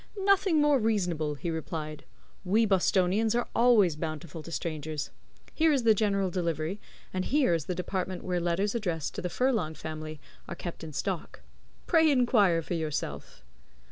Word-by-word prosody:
"Nothing 390 -4 +4
more 295 -2 +4
reasonable," 175 -9 0
he 165 +5 -4
replied. 155 -1 -5 0.4
"We 210 +5 +3
Bostonians 195 +2 +2
are 240 - 0
always 225 -9 +5
bountiful 155 0 -5
to 165 - -10
strangers. 155 -2 -4 0.4
Here 320 0 +3
is 275 -4 +2
the 225 -1 +6
General 200 -3 +1
Delivery, 170 +1 -2 0.3
and 185 0 -1
here 275 - +2
is 165 - -1
the 180 - -3
department 185 0 -3
where 180 -1 -1
letters 175 +4 0
addressed 175 -10 -2
to - - -5
the 180 - -2
Furlong 220 -8 0
family 155 0 -6 0.3
are 170 - -5
kept 170 -1 -7
in 160 - -7
stock. 175 +4 -4 0.4
Pray 320 -2 +4
inquire 215 - +3
for 175 - -4
yourself." 150 - -4
180 Hz, 160 wpm, -29 LUFS, 160-220 Hz, 0.4 s, the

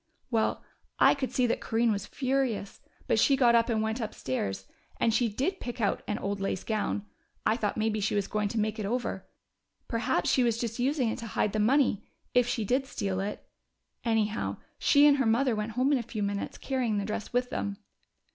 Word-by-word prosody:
"Well, 225 -2 +1 0.3
I - - +6
could 275 -2 -3
see 250 - +2
that 235 - 0
Corinne 230 0 +1
was 200 -1 -2
furious, 260 -6 -1 0.2
but - - +2
she 275 - +5
got 245 -3 +4
up 230 +1 +4
and 220 -2 +1
went 220 +2 -1
upstairs. 115 - -3 0.3
And 230 - +3
she 235 0 +2
did 280 - -1
pick 245 0 -6
out 205 -3 +1
an 210 - -1
old 200 0 -3
lace 195 -1 -2
gown 210 -1 -1 0.4
I 220 - +3
thought 210 -4 -2
maybe 215 0 0
she 205 +1 0
was 200 -1 0
going 210 0 0
to 225 - -2
make 215 +1 -1
it 210 - -2
over. 245 +3 -2 0.6
Perhaps 225 -6 0
she 260 - +3
was 235 -2 +2
just 230 0 -3
using 260 -1 +1
it 225 - -3
to 230 - -6
hide 210 -2 0
the 215 - 0
money, 245 -1 +3 0.3
if 245 -1 +4
she 225 -3 -1
did 260 +5 +1
steal 195 -6 -2
it.... 200 +2 -4 0.6
Anyhow, 220 -2 0 0.2
she 285 0 +5
and 290 -1 +6
her 265 -4 +2
mother 235 +2 +3
went 210 +1 -3
home 255 +4 +2
in 280 - +3
a - - -1
few 220 -2 -4
minutes, 200 0 -3
carrying 250 -6 -1
the 200 - -1
dress 210 0 -4
with 245 +1 0
them." 200 -1 -3
225 Hz, 215 wpm, -29 LUFS, 210-250 Hz, 0.6 s, I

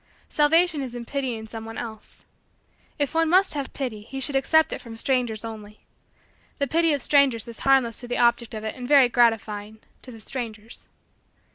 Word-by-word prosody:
Salvation 315 +1 +3
is 250 -3 -6
in 240 -1 -6
pitying 250 -5 -3
someone 225 0 -8
else. 220 -2 -9 0.7
If 285 0 -1
one 325 0 +2
must 375 +1 +4
have 280 -2 -4
pity 245 -7 -5
he 270 +6 -8
should 270 +1 0
accept 315 +4 +3
it - - -6
from 230 -2 -10
strangers 235 -4 0
only. 215 -2 -9 0.8
The 280 - 0
pity 330 +4 +2
of 280 - -2
strangers 275 -6 +3
is 230 -2 -10
harmless 265 -5 +2
to 245 - -9
the 245 - -2
object 235 -1 +2
of 215 - -6
it 220 - -3
and 250 -1 -7
very 275 -3 +6
gratifying 220 -3 +1 0.2
to 255 - -11
the 225 - -12
strangers. 225 -2 -7
245 Hz, 180 wpm, -24 LUFS, 225-280 Hz, 0.8 s, very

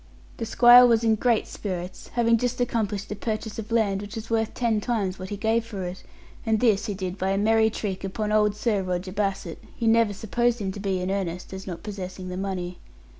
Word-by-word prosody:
The 230 - -4
squire 245 +2 +8
was 230 -1 +3
in 225 -1 +4
great 225 +1 +2
spirits, 185 -2 -6
having 230 -1 +4
just 245 +1 -1
accomplished 215 -5 -1
a - - -2
purchase 220 +1 -4
of 220 +1 -7
land 205 -4 +2
which 205 0 -8
was 225 0 -7
worth 225 -1 0
ten 230 -3 +1
times 200 -6 -1
what 185 0 -6
he 205 - -4
gave 225 +2 +1
for 210 -5 -6
it; 180 +1 -6 0.4
and 220 -2 +1
this 225 -2 +2
he 205 - -2
did 185 0 -5
by 190 - 0
a 195 - +1
merry 220 +2 +4
trick 195 -3 -4
upon 210 +2 -2
old 210 -1 +3
Sir 210 -2 0
Roger 185 0 -3
Bassett, 195 -4 -3 0.2
who 235 - -1
never 225 -2 +4
supposed 235 +4 0
him 200 -4 -3
to 200 - -8
be 195 -2 -1
in 185 +1 -2
earnest, 185 -2 -3
as 190 0 -7
not 175 -3 -6
possessing 185 -3 -6
the 180 - -5
money. 185 -2 -4
210 Hz, 225 wpm, -25 LUFS, 190-225 Hz, 0.4 s, squire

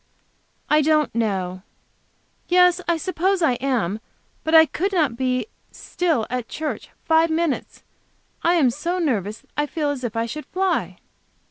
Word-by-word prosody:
"I 300 0 +4
don't 305 0 +2
know. 190 -5 -1 0.9
Yes. 360 0 +4
I 340 -1 +2
suppose 370 +2 0
I 320 - +4
am. 225 -7 0 0.4
But 315 +1 +2
I 320 0 +9
could 380 +6 -2
not 310 -10 +1
be 255 0 0 0.3
still 325 -11 -1
at 250 -2 -3
church 310 -1 -4 0.2
five 325 0 +4
minutes. 320 -2 -2 0.6
I 345 +1 +3
am 275 -8 +4 0.3
nervous 215 - -1
that 275 - -32
I 295 0 0
feel 295 -2 -1
as 270 -3 -5
if 235 -2 -3
I 230 0 0
should 305 +6 -7
fly." 380 0 -1
300 Hz, 150 wpm, -22 LUFS, 240-335 Hz, 0.9 s, I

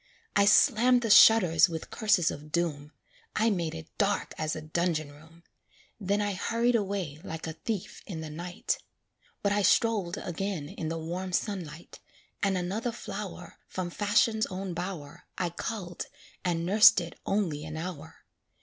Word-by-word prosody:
I 200 - +5
slammed 240 +4 +5
the 225 - +1
shutters 185 -6 +7
with 160 -1 -6
curses 210 -7 +2
of 150 +1 -9
doom; 150 -3 -1 0.4
I 225 +1 +3
made 170 -5 -2
it 160 0 -10
dark 205 -1 0
as 155 0 -2
a 155 - -5
dungeon 155 -1 -1
room, 160 +3 -17 0.6
Then 200 0 0
I 205 -1 0
hurried 230 +5 +1
away 195 -9 -1
like 160 0 -6
a 160 - -4
thief 205 +3 -5
in 165 -5 -5
the 160 - -6
night; 175 +3 -3 0.6
But 200 - +2
I 205 0 +2
strolled 205 -2 +2
again 175 -5 -4
in 170 -4 -5
the 165 - -3
warm 175 +3 -4
sunlight, 175 -6 -4 0.4
And 195 -2 +2
another 205 +7 -2
flower 200 -5 -7
From 180 -2 -4
Fashion's 220 +3 +2
own 185 -1 -5
bower 175 -2 -6
I 175 -2 -1
culled, 180 -1 -5 0.4
and 170 -2 0
nursed 205 +2 +7
it 170 -1 -8
only 175 -8 0
an 155 +1 -6
hour. 160 -2 -7
180 Hz, 160 wpm, -29 LUFS, 160-205 Hz, 0.6 s, shutters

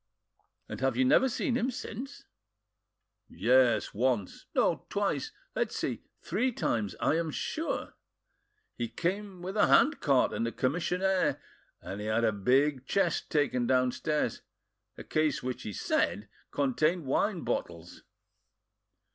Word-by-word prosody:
"And - - -7
have 130 -3 +1
you 130 - +4
never 265 - +5
seen 245 0 -1
him 245 +1 +1
since?" 255 +2 -7 1.1
"Yes, 120 +6 +3
once—no, 115 -3 0
twice. - - -1 0.2
Let's - - -1
see—three 250 +4 -2
times, 110 - -1
I 160 - +2
am 165 -1 -2
sure. 315 - -3 0.8
He 120 - -2
came 185 - -3
with 190 +3 -5
a 210 - +4
hand 290 -1 +5
cart 135 - +3
and 115 - -1
a - - -2
commissionaire, 180 +8 0 0.4
and 100 +2 -6
had 110 +2 0
a 110 - +4
big 130 +6 +1
chest 175 -5 0
taken 130 -5 +1
downstairs—a 130 +4 -2
case 155 -2 0
which 130 0 -3
he 105 - -5
said 100 +1 0 0.2
contained 155 +5 +1
wine 190 +10 +1
in - - -6
bottles.... 85 0 -4
140 Hz, 125 wpm, -30 LUFS, 120-185 Hz, 1.1 s, never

